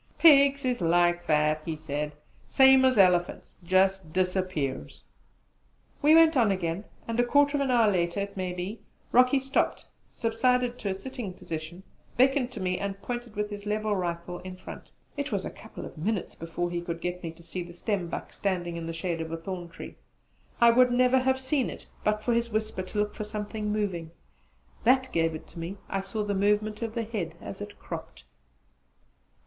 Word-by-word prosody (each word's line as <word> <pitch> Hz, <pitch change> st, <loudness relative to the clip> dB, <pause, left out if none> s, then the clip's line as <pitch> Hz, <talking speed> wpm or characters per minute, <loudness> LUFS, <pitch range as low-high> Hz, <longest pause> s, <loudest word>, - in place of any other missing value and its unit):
"Pigs 280 Hz, -3 st, +6 dB
is 250 Hz, -5 st, 0 dB
like 175 Hz, +1 st, +2 dB
that," 150 Hz, 0 st, +2 dB
he 160 Hz, -1 st, -3 dB
said, 150 Hz, -1 st, -4 dB, 0.3 s
"same 265 Hz, -1 st, +6 dB
as 255 Hz, -2 st, +3 dB
elephants 180 Hz, -3 st, +3 dB
jus' 190 Hz, +2 st, +3 dB
disappears!" 180 Hz, -5 st, -2 dB, 1.0 s
We 305 Hz, +2 st, +6 dB
went 325 Hz, -1 st, +6 dB
on 235 Hz, -5 st, +4 dB
again, 185 Hz, +1 st, -2 dB, 0.2 s
and 230 Hz, +1 st, -2 dB
a -, -, +6 dB
quarter 285 Hz, +4 st, +3 dB
of -, -, 0 dB
an 275 Hz, -, 0 dB
hour 230 Hz, -4 st, +4 dB
later, 175 Hz, +1 st, 0 dB
it 200 Hz, 0 st, -5 dB
may 185 Hz, -2 st, -2 dB
be, 180 Hz, +5 st, -5 dB, 0.3 s
Rocky 255 Hz, +3 st, +5 dB
stopped, 270 Hz, +1 st, 0 dB, 0.3 s
subsided 245 Hz, +2 st, +1 dB
to 200 Hz, -, -2 dB
a 190 Hz, -, -1 dB
sitting 230 Hz, -1 st, -6 dB
position, 165 Hz, +1 st, -7 dB, 0.3 s
beckoned 260 Hz, 0 st, +3 dB
to -, -, -6 dB
me, 180 Hz, -1 st, -1 dB
and 200 Hz, 0 st, -3 dB
pointed 240 Hz, -2 st, -5 dB
with 210 Hz, 0 st, -2 dB
his 205 Hz, 0 st, -7 dB
levelled 210 Hz, -1 st, 0 dB
rifle 175 Hz, 0 st, -3 dB
in 185 Hz, 0 st, -8 dB
front. 185 Hz, -, -10 dB, 0.3 s
It 285 Hz, -1 st, -3 dB
was 200 Hz, -3 st, -1 dB
a -, -, -4 dB
couple 220 Hz, -, -10 dB
of -, -, -10 dB
minutes 200 Hz, +3 st, -2 dB
before 165 Hz, +1 st, -4 dB
he 175 Hz, 0 st, -2 dB
could 170 Hz, -1 st, -4 dB
get 180 Hz, +1 st, -4 dB
me 170 Hz, -, -4 dB
to 170 Hz, +1 st, -17 dB
see 175 Hz, +2 st, -5 dB
the 175 Hz, 0 st, -8 dB
stembuck 180 Hz, -1 st, -3 dB
standing 175 Hz, -3 st, -2 dB
in 165 Hz, -1 st, -5 dB
the 165 Hz, -, -4 dB
shade 165 Hz, 0 st, -3 dB
of 160 Hz, 0 st, -5 dB
a 165 Hz, -, -2 dB
thorn 175 Hz, +1 st, -6 dB
tree. 180 Hz, -, -10 dB, 0.6 s
I 235 Hz, -1 st, +7 dB
would 250 Hz, +1 st, +5 dB
never 250 Hz, +1 st, +4 dB
had 260 Hz, +1 st, +2 dB
seen 265 Hz, 0 st, 0 dB
it -, -, -9 dB, 0.2 s
but 210 Hz, 0 st, +1 dB
for 240 Hz, -, +1 dB
his 235 Hz, 0 st, +1 dB
whisper 215 Hz, -3 st, -2 dB
to 185 Hz, +3 st, -7 dB
look 210 Hz, 0 st, 0 dB
for -, -, -5 dB
something 210 Hz, 0 st, -4 dB
moving: 195 Hz, -6 st, -2 dB, 0.7 s
that 260 Hz, +2 st, +3 dB
gave 165 Hz, -1 st, +1 dB
it 155 Hz, -, -8 dB
to 170 Hz, -, -11 dB
me; 175 Hz, +4 st, -5 dB
I 195 Hz, -, -1 dB
saw 205 Hz, +2 st, -3 dB
the 205 Hz, -1 st, -1 dB
movement 210 Hz, +2 st, +1 dB
of 225 Hz, -1 st, -4 dB
the 230 Hz, -, 0 dB
head 200 Hz, -7 st, -4 dB
as 100 Hz, -, -8 dB
it -, -, -8 dB
cropped. -, -, -8 dB
200 Hz, 195 wpm, -28 LUFS, 175-240 Hz, 1.0 s, I